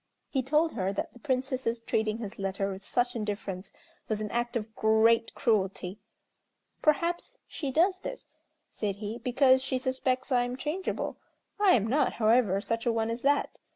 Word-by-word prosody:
He 265 - +1
told 305 +5 +2
her 190 -3 -1
that - - -3
the 245 - -15
Princess's 255 -1 -1
treating 220 -1 0
his 215 -2 -7
letter 195 0 -1
with 190 +1 -8
such 245 +2 0
indifference 200 -3 -4 0.4
was 215 -1 0
an 215 -1 -4
act 240 0 -1
of 220 -1 -3
great 225 +1 +4
cruelty. 195 -2 0 0.8
"Perhaps 335 +3 +1
she 285 - -4
does 360 +7 +3
this," - - -7 0.5
said 205 -3 -2
he, 210 +3 -5
"because 260 0 +4
she 260 0 -1
suspects 260 +1 -1
I 250 -1 +4
am 245 +1 -4
changeable. 310 +8 -3 0.4
I 405 -3 +6
am 215 -4 +2
not, 265 +7 +2
however, 220 -3 +3
such 230 +2 -2
a - - +4
one 225 0 0
as 235 +1 -3
that. 285 +2 +1
235 Hz, 170 wpm, -29 LUFS, 215-260 Hz, 0.8 s, I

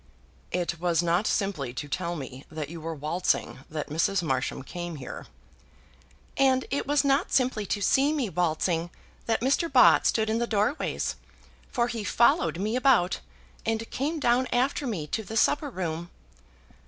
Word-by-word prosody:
"It 175 -2 -2
was 175 -1 +1
not 175 +5 +2
simply 150 -11 -1
to 145 - -4
tell 170 +3 -2
me 135 -3 -7
that 155 -2 -5
you 165 0 -8
were 165 +1 -4
waltzing 155 0 -1
that 155 -1 -4
Mrs. 175 +4 +1
Marsham 130 -3 -1
came 175 +3 -6
here." 135 -3 -8 1.1
"And 265 -1 +3
it 280 - -1
was 290 0 +3
not 280 +5 +2
simply 245 -6 +1
to 205 - -1
see 275 +8 +3
me 290 -6 0
waltzing 170 -1 0 0.4
that 225 -1 +1
Mr. 275 +6 +1
Bott 255 -2 +6
stood 220 -1 +1
in 220 +1 0
the 235 - 0
doorways, 220 +7 -1 0.5
for 240 -2 +1
he 235 -3 -4
followed 240 - +3
me 210 +5 -1
about, 250 -9 +3 0.4
and 225 0 -1
came 305 +5 -2
down 250 -1 +2
after 265 +3 +1
me 185 -10 -3
to 220 - -2
the 220 +2 -5
supper 290 +6 +2
room." 170 -5 -4
200 Hz, 165 wpm, -27 LUFS, 165-255 Hz, 1.1 s, Bott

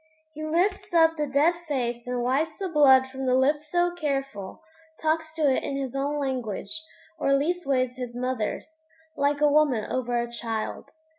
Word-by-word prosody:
He 310 0 -7
lifts 350 +4 0
up 325 -1 +5
the 300 -2 -1
dead 285 +5 +3
face 240 -4 -2
and 250 -1 -1
wipes 295 +6 0
the 390 - -3
blood 270 -5 +6
from 265 0 -5
the 255 - +3
lips 295 +3 +1
so 350 0 +2
careful; 275 - -4 0.4
talks 315 0 0
to 320 - -2
it 270 -3 +3
in 275 - -3
his 270 -3 -3
own 280 +2 -1
language 255 -2 -3 0.4
(or 275 -2 +3
leastways 275 -5 0
his 245 -2 -6
mother's) 255 +5 -3 0.3
like 285 +1 +1
a 300 - +6
woman 285 -7 +3
over 245 -2 0
a 235 - -1
child. 230 -2 -4
275 Hz, 170 wpm, -26 LUFS, 250-310 Hz, 0.4 s, blood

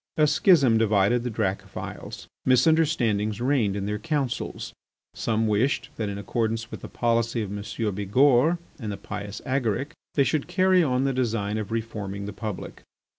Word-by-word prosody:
A 155 - +5
schism 145 - +4
divided 110 +2 +3
the 125 - -2
Dracophils. 100 -4 -4 0.2
Misunderstandings 125 -7 +2
reigned 120 -6 +1
in 100 -1 -3
their 105 +1 -2
councils. 145 -6 -3 0.4
Some 110 0 0
wished 110 +6 +1
that 110 -2 -2
in 100 - -4
accordance 115 +2 -2
with - - -7
the - - -7
policy 115 -1 0
of 100 0 -5
M. 100 - -5 0.3
Bigourd 125 - +3 0.2
and 110 -5 -4
the 100 - -5
pious 105 -1 -7
Agaric, 130 +2 -1 0.2
they 140 - +5
should 150 +1 0
carry 185 +1 +4
on 130 -5 +1
the 135 0 +1
design 110 -4 -1
of 105 -1 -5
reforming 105 -3 -4
the 105 - -5
Republic. 105 -1 -6
115 Hz, 160 wpm, -25 LUFS, 105-135 Hz, 0.4 s, A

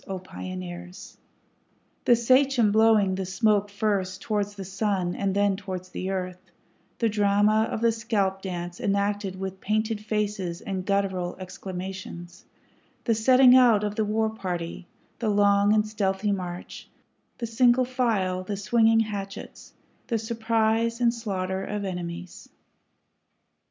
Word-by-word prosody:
O 190 - -3
Pioneers! 180 0 -8 0.9
The 240 - +6
sachem 255 -1 +3
blowing 215 -3 +4
the 190 0 -3
smoke 205 +1 +2
first 200 -2 -1
towards 205 -1 -1
the 195 -1 -7
sun 195 -2 -1
and 195 -1 -1
then 200 -1 +2
towards 185 -2 -6
the 185 +1 -4
earth, 185 -1 -3 0.6
The 230 - +1
drama 210 +1 +2
of 220 - -3
the 230 0 +4
scalp 210 -4 -1
dance 175 -2 -5
enacted 200 -1 -1
with 190 0 -5
painted 215 +1 -1
faces 205 -5 -2
and 190 -1 -4
guttural 190 -3 0
exclamations, 185 -1 -8 0.6
The 230 - +2
setting 255 +3 +6
out 235 -5 +6
of 210 -1 -1
the 220 - 0
war 220 +1 0
party, 180 -4 -5 0.3
the 230 -2 0
long 205 0 +4
and 215 0 +3
stealthy 205 -1 -1
march, 180 -2 -6 0.5
The 235 - -3
single 240 +2 +3
file, 220 -8 0
the 200 +2 -4
swinging 225 +2 +3
hatchets, 200 -2 -6 0.3
the 230 - 0
surprise 225 +1 0
and 235 -1 +3
slaughter 190 -5 -3
of 205 0 -4
enemies. 175 -1 -6
205 Hz, 135 wpm, -26 LUFS, 190-220 Hz, 0.9 s, The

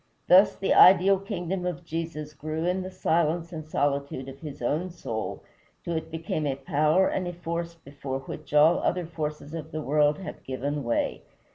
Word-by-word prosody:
Thus 190 +3 +7
the 195 - +1
ideal 190 +1 +7
kingdom 190 -2 -3
of 175 -1 -4
Jesus 160 -2 -5
grew 155 +3 -4
in 180 +1 0
the 185 - -5
silence 170 -1 0
and 155 -1 -5
solitude 140 -3 -1
of 135 +1 -11
his 150 -2 -8
own 155 +9 -1
soul 115 -11 -5 0.4
till 170 - -3
it 160 0 -3
became 160 -2 -3
a 135 - 0
power 155 +5 +2
and 185 -1 -1
a 175 - -4
force 170 0 -4
before 140 -3 -6
which 150 +1 -9
all 150 +3 +5
other 180 -1 0
forces 150 -2 -5
of 165 -2 -6
the 155 - -3
world 150 +1 +3
have 190 - -8
given 140 +2 -3
way. 120 -1 -1
160 Hz, 180 wpm, -27 LUFS, 145-175 Hz, 0.4 s, Thus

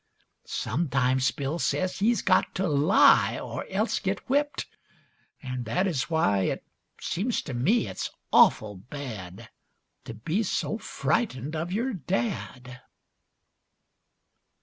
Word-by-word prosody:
Sometimes 130 -2 +1
Bill 145 +4 -3
says 185 +2 -1
he's 230 +4 +2
got 185 - +2
to 190 0 0
lie 150 +4 +5
Or - - -6
else - - 0
get - - -1
whipped, 290 +2 0 0.8
an' 125 -1 -4
that 150 - 0
is 165 -8 -1
why 100 -12 +2
It 95 - -1 0.4
seems 215 +8 -1
to 140 - -6
me 190 - +2
it's - - -4 0.2
awful 105 -2 +5
bad 105 -6 -8 0.5
To 115 - -7
be 160 - -1
so 215 +1 -1
frightened 160 - -1
of 165 +3 -3
your 235 +6 -1
dad. 125 - -3
145 Hz, 120 wpm, -27 LUFS, 125-190 Hz, 0.8 s, lie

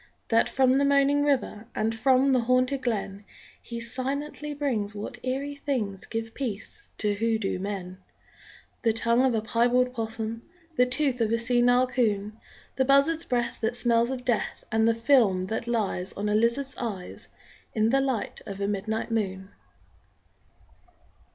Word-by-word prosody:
That 230 0 +3
from 260 -1 +3
the 275 +1 +3
moaning 280 +1 +3
river 255 -6 0
And 220 +1 0
from 260 +4 +3
the 255 - +4
haunted 255 +3 +1
glen 205 -4 -3 0.4
He 235 -1 -6
silently 275 +5 -3
brings 225 -8 -1
what 205 - -7
eerie 270 +3 -2
things 235 -9 -3
Give 225 0 -4
peace 245 - -6
to 210 -1 +1
hoodooed 220 -3 -1
men: 190 -2 -5 0.8
_The 225 -2 +2
tongue 235 +2 +2
of 260 -3 +2
a 215 - -1
piebald 245 +3 +2
'possum, 225 -1 -4 0.3
The 250 -3 +4
tooth 260 -1 0
of 225 -1 +1
a 230 - +3
senile 245 +1 +3
'coon, 220 -4 -1 0.4
The 265 - +3
buzzard's 280 +5 +3
breath 240 -2 -1
that 225 +1 0
smells 235 -1 +2
of 255 -2 -4
death, 240 -4 -1
And 220 0 +3
the 230 - +3
film 230 -6 +3
that 225 +4 -3
lies 210 -6 -1
On 205 +1 -3
a - - +1
lizard's 235 +6 +1
eyes 205 -7 -6 0.5
In 220 +1 +2
the 270 +1 +3
light 260 -5 -2
of 200 -1 -6
a 200 - -1
midnight 215 +3 -2
moon! 190 -3 -2
235 Hz, 155 wpm, -27 LUFS, 215-260 Hz, 0.8 s, the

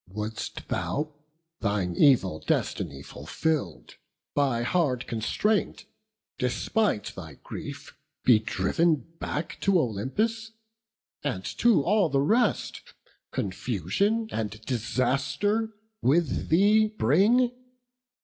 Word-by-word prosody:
Wouldst 105 +3 -5
thou, 150 +1 -2 0.5
thine 100 -5 -1
evil 95 - +4
destiny 70 0 -2
fulfill'd, 145 - -3 0.4
By 135 -5 +1
hard 130 -3 +1
constraint, 200 - 0 0.5
despite 125 - 0
thy 80 -6 -9
grief, - - -8 0.3
be 120 -4 +6
driv'n 135 - +1 0.2
Back 165 +2 -4
to 195 -2 +4
Olympus; 210 - -1 0.7
and 115 -10 -2
to 225 -11 +5
all 195 -1 +3
the 140 - +1
rest 215 - +1 0.5
Confusion 125 - -1
and 110 -1 -3
disaster 135 - 0 0.3
with 160 +5 +1
thee 210 +6 +5
bring? 215 - +3
140 Hz, 90 wpm, -27 LUFS, -, 0.7 s, be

